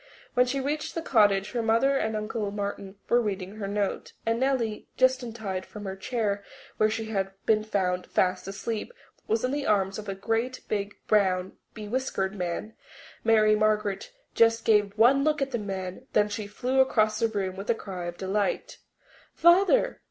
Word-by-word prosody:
When 250 0 +4
she 275 +2 -1
reached 290 +3 -3
the 330 - -2
cottage 205 -5 +3
her 240 - -1
mother 230 +5 +3
and 220 -4 0
Uncle 215 0 -2
Martin 200 -1 -5
were 240 +1 +4
reading 200 -2 -4
her 200 -2 -4
note, 200 0 -2
and 230 +1 +1
Nellie, 250 -5 0
just 260 0 +4
untied 220 -6 -4
from 210 +1 -10
the 190 -1 -4
chair 205 -1 -2 0.3
where 215 - +4
she 220 0 -3
had 195 -2 -1
been 215 -1 +3
found 185 -4 -1
fast 185 0 0
asleep, 215 - -4 0.3
was 225 +3 +1
in 255 - -1
the 285 0 -2
arms 195 -1 +1
of 210 - -7
a 195 - -3
great, 225 +6 -1
big, 205 -1 -2
brown, 190 -3 +2 0.2
bewhiskered 215 -3 -2
man. 180 +3 -4 0.5
Mary 215 -1 +5
Margaret 215 - 0 0.2
just 230 0 +3
gave 205 -2 +3
one 260 +5 +5
look 305 0 +2
at 275 -1 -1
the 240 - -1
man. 195 +3 -5
Then 210 0 +3
she 205 0 -4
flew 250 +6 -1
across 215 -5 +3
the 230 - +3
room 195 -4 -3
with 195 +4 -7
a 235 - +4
cry 185 -5 -6
of 175 0 -5
delight. 195 +2 -2 0.6
"Father!" 390 +9 +4
215 Hz, 180 wpm, -27 LUFS, 195-235 Hz, 0.6 s, Mary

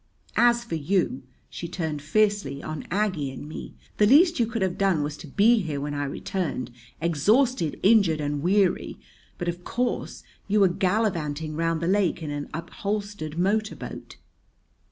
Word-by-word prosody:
As 235 0 +4
for 235 - -8
you" 160 -3 0 0.3
she 170 - -6
turned 160 -4 -3
fiercely 200 -4 +1
on 155 -1 -6
Aggie 185 -7 0
and 135 +2 -8
me 155 - -8 0.2
"the 210 - +5
least 330 - +6
you 235 - +3
could 230 -3 -2
have 185 -2 0
done 190 -6 +2
was 150 +1 -3
to - - -10
be 215 - +4
here 155 -5 -3
when 145 +1 -3
I 145 0 -2
returned, 140 -2 -3 0.3
exhausted, 170 - +2
injured, 195 -7 +5
and 145 -1 -2
weary; 185 +2 +1 0.4
but, 175 - -4
of 175 +1 -3
course, 245 +5 -2 0.2
you 210 +1 +2
were 195 -2 +6
gallivanting 175 -6 -1
round 165 0 0
the 170 - -1
lake 185 -3 +1
in 150 - -4
an 145 0 -4
upholstered 200 -1 -4
motor 210 +4 +1
boat." - - -9
175 Hz, 165 wpm, -25 LUFS, 155-210 Hz, 0.4 s, least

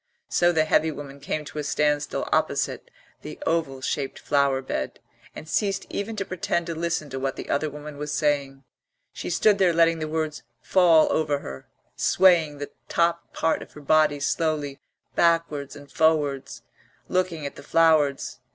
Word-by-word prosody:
So 175 0 +3
the 160 -2 +2
heavy 160 0 +3
woman 140 -2 -8
came 150 +2 -3
to 150 - -7
a - - -2
standstill 150 0 0
opposite - - 0 0.3
the - - -8
oval 155 -5 -1
shaped 135 +1 -2
flower 140 -2 +1
bed, 65 - -4 0.4
and 155 - -9
ceased 195 +3 0
even 215 +2 -3
to 200 -2 -3
pretend 170 -1 -2
to 170 - -3
listen 165 -3 -2
to 135 - -4
what 135 0 -2
the - - -8
other 150 +2 0
woman 150 0 -9
was 150 0 -4
saying. 140 -2 0 0.5
She - - -5
stood 200 +4 +3
there 180 -3 +4
letting 165 0 +3
the 155 - -3
words 155 -1 -2 0.2
fall 170 -4 +5
over 150 -2 +1
her, 65 0 -9 0.3
swaying 165 -6 +4
the 145 0 -6 0.2
top 170 0 0
part 160 - 0
of - - -11
her 150 - -11
body 150 0 +3
slowly 150 -1 -1 0.3
backwards 165 -5 +1
and 145 0 -13
forwards, 150 -4 +1 0.4
looking 180 -4 -1
at 140 - -5
the - - -10
flowers. 150 -2 +2
155 Hz, 170 wpm, -25 LUFS, 145-165 Hz, 0.5 s, fall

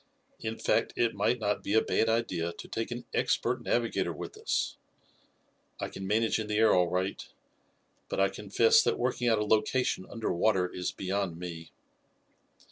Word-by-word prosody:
In 110 0 -4
fact, - - +1
it 115 -1 +1
might 105 +5 +1
not 105 -3 -1
be 100 - -1
a 110 - +6
bad 115 - +1
idea 90 -7 0
to - - -10
take 115 - -3
an 120 0 -6
expert - - +1
navigator 120 -2 0
with - - -7
us. - - -1 1.0
I - - -3
can 95 - -7
manage 110 +3 +2
in 110 - -3
the 105 0 -1
air 110 0 +5
all 90 -1 +4
right, 90 +2 -2 0.9
but - - -2
I 95 0 +4
confess 105 +3 +4
that - - +1
working 125 0 0
out 115 -2 +4
a 105 - 0
location 110 -1 +1
under 115 -2 -2
water 90 +1 +2
is 90 0 -3
beyond 95 -2 -2
me." 85 -2 -7
105 Hz, 175 wpm, -30 LUFS, 95-115 Hz, 1.0 s, a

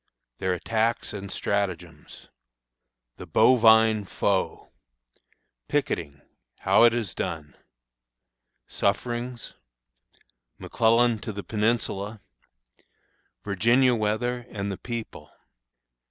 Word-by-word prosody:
Their 95 -1 0
Attacks 115 +5 -1
and 100 -1 -7
Stratagems. 90 -6 -4 0.9
The 90 - -10
Bovine 110 +1 +5
Foe. 95 0 -2 1.0
Picketing; 70 0 -2 0.4
how - - +5
it 120 - +5
is 110 -6 -3
done. 80 -4 -5 1.1
Sufferings. 120 +4 -2 1.0
McClellan 115 0 +2
to 110 - -6
the 100 -1 -7
Peninsula. 105 -1 -1 1.2
Virginia 120 +6 +3
Weather 120 +3 -1
and 100 -1 -4
the 95 - -5
People. 115 -2 -7
110 Hz, 80 wpm, -25 LUFS, 100-120 Hz, 1.2 s, Bovine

